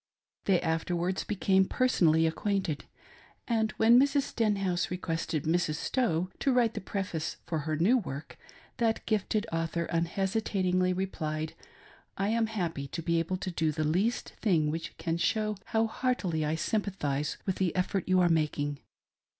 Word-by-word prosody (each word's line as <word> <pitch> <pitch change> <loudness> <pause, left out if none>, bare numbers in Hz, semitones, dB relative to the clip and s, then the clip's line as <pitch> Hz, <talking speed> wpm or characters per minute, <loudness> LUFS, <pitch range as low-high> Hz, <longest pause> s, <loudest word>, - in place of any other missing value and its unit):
They 190 -3 +4
afterwards 175 +2 -1
became 190 -2 +2
personally 165 -10 +3
acquainted; 180 -1 -1 0.6
and 220 -2 +1
when 230 +2 +6
Mrs. 280 +1 +3
Stenhouse 195 -7 0
requested 165 -4 -2
Mrs. 165 -1 +1
Stowe 185 - 0
to 275 - +2
write 240 -3 +3
the - - -4
preface 185 -4 -3
for 160 - -2
her 155 +1 -2
new 220 - +4
work, 150 - -7 0.4
that 225 -1 0
gifted 215 0 0
author 165 +1 -1
unhesitatingly 185 +1 0
replied: 160 -4 -3 0.3
" - - -25
I 195 +1 0
am 225 0 +2
happy 170 -10 -3
to 165 +4 -5
be 170 +1 +2
able 175 +3 -1
to 185 0 -4
do 160 -2 +1
the 155 +1 -2
least 185 +10 0
thing 160 -8 +2
which 165 +1 -5
can 165 -1 -1
show 215 +4 +1
how 225 0 +1
heartily 220 -9 -1
I 150 +1 0
sympathise 160 -7 -1
with 190 - -1
the 185 -3 0
effort 185 0 -1
you 185 0 +5
are 175 - +5
making. 150 -3 0
180 Hz, 155 wpm, -30 LUFS, 160-210 Hz, 0.6 s, when